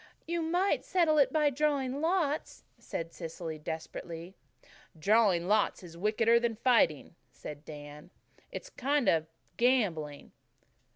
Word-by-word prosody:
"You 340 0 -1
might 350 +5 +1
settle 325 -4 +3
it 280 - +4
by 300 -2 +3
drawing 280 -1 0
lots," 320 -3 0 0.2
said 165 0 -5
Cecily 165 -2 -6
desperately. 165 +2 -6 0.6
"Drawing 195 -1 +3
lots 210 -1 +2
is 170 -2 -11
wickeder 220 +5 +3
that 235 -2 -1
fighting," 225 - +3 0.2
said 150 -1 -9
Dan. 150 +1 -10 0.4
"It's - - -7
a - - -31
kind 280 +1 0
of 160 -1 +3 0.3
gambling." 185 - +1
220 Hz, 125 wpm, -31 LUFS, -, 0.6 s, it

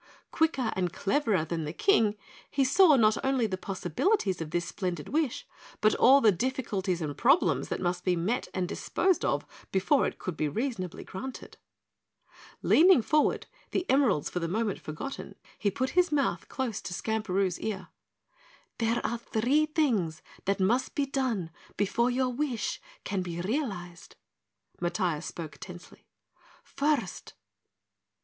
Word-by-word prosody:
Quicker 275 -8 +1
and 180 -2 0
cleverer 200 - +1
than 165 0 -3
the 150 - -3
King, 220 - +3 0.3
he 275 - +1
saw 310 +3 +6
not 220 -3 +3
only 265 -3 +2
the 195 -3 -1
possibilities 190 - 0
of 160 - -4
this 170 +1 -1
splendid 175 -4 -4
wish, 300 -4 -1 0.3
but 215 0 +4
all 275 +2 +6
the 220 - +6
difficulties 195 -5 -1
and 145 -2 -3
problems 275 +8 +3
that - - -3
must 180 0 -1
be 180 -1 +2
met 195 +9 -1
and 185 -1 -1
disposed 365 - 0
of - - 0 0.3
before 195 +9 +3
it - - -6
could 185 - -5
be 155 - 0
reasonably 205 - -3
granted. 255 +7 -8 1.1
Leaning 340 -6 +6
forward, 305 +6 +2 0.2
the 370 - -2
emeralds 255 - +3
for 180 - -3
the 165 - -2
moment 210 +3 -1
forgotten, 160 - -7 0.2
he 205 - +2
put 260 +7 -2
his 360 -2 +3
mouth 285 -2 0
close 245 -6 -3
to 180 - -5
Skamperoo's 195 -4 -1
ear. 210 -3 -4 0.9
"There 230 +1 0
are 235 - -1
three 255 +7 +1
things 230 - 0 0.2
that 200 +1 0
must 225 +7 +1
be 285 - +1
done 250 -11 -1 0.3
before 215 +5 +2
your 255 +1 +1
wish 250 -3 -2 0.2
can 200 -2 -2
be 175 -1 -5
realized." 185 - -4 0.7
Matiah 175 -3 0
spoke 160 -3 -7
tensely. 180 -2 -11 0.6
"First 280 -10 -2
215 Hz, 145 wpm, -29 LUFS, 180-265 Hz, 1.1 s, saw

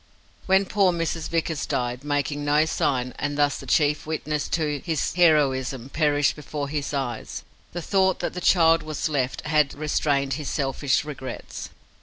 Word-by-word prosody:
When 190 +1 +4
poor 195 -1 +3
Mrs. 165 -1 -2
Vickers 165 -2 -1
died, 125 +1 -2
making 145 0 -1
no 150 +2 +3
sign, 130 -5 0
and 145 0 -2
thus 145 -1 +2
the - - -10
chief 150 0 +2
witness 150 -1 -2
to 150 -3 -1
his 160 -3 -2
heroism 135 -7 +2
perished 145 -2 +2
before 145 -1 -5
his 145 -2 -3
eyes, 130 -5 -4 0.3
the 175 0 -5
thought 190 0 +2
that - - -3
the 180 - -5
child 165 -2 +5
was 155 0 -3
left 135 -4 -1
had 150 -2 +1
restrained 145 -2 0
his 145 +1 -4
selfish 140 0 0
regrets. 135 -3 -7
150 Hz, 160 wpm, -24 LUFS, 140-160 Hz, 0.3 s, child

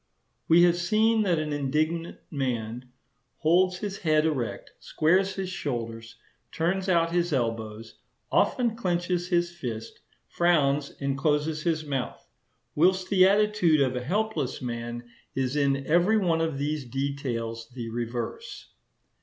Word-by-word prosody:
We 170 +2 +6
have 175 0 +4
seen 215 +5 +2
that 180 -5 +2
an 155 -1 -2
indignant 155 +4 -1
man 125 -4 -3 0.5
holds 180 +3 +3
his 200 0 -5
head 155 -2 +2
erect, 135 -8 -2
squares 190 +5 +1
his 190 -1 -4
shoulders, 115 -8 -5 0.4
turns 185 +4 -1
out 165 -2 +3
his 175 0 +1
elbows, 115 -3 -3 0.3
often 235 -3 +2
clenches 175 -4 -1
his 175 -1 +1
fist, 120 -10 -6 0.3
frowns, 145 -5 +2
and 140 -1 -1
closes 150 +2 0
his 155 -1 -1
mouth; 135 -4 -4 0.5
whilst 185 +4 +2
the 185 -1 +6
attitude 205 -6 +3
of 130 -2 +2
a 125 - -3
helpless 180 - -1
man 120 -1 -5 0.3
is 130 0 -1
in 140 -1 +1
every 175 +8 +3
one 170 -5 +1
of 160 -3 -1
these 145 +1 -2
details 120 -4 -3
the 120 -2 -6
reverse. 120 - -5
155 Hz, 135 wpm, -27 LUFS, 130-175 Hz, 0.5 s, We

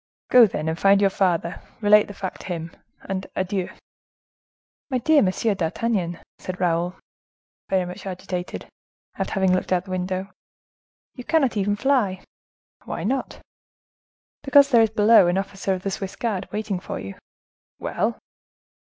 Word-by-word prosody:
Go, 245 -3 +8
then, 155 -5 -4
and 160 +1 -2
find 195 0 +5
your 200 -1 +3
father, 175 -3 0 0.2
relate 210 -1 +5
the 205 - -9
fact 190 -1 -6
to - - -10
him—and 180 +2 -6
adieu!" 190 0 -2 1.2
"My 260 - 0
dear 300 +4 +4
Monsieur 205 +3 +1
d'Artagnan," 180 0 -1 0.2
said 185 0 -6
Raoul, 175 0 0 0.7
very 190 -2 +1
much 180 +2 -8
agitated, 180 -1 -5 0.5
after - - -2
having 190 -1 +3
looked 185 - -1
out 185 0 +1
the 190 - -9
window, 185 +1 -3 0.8
"you 250 - -9
cannot 275 -4 +2
even 205 0 +1
fly!" 210 -6 +1 0.6
"Why - - -4
not?" 255 +5 -2 1.0
"Because 280 0 +5
there 235 -2 +6
is 225 - +4
below 215 -2 +5
an 175 +2 +1
officer 195 0 -3
of 185 - -8
the 195 - -2
Swiss 190 0 -5
guards 205 -5 -3
waiting 210 -3 -2
for - - -6
you." 95 0 -7 0.6
"Well?" - - -2
195 Hz, 150 wpm, -23 LUFS, 180-215 Hz, 1.2 s, Go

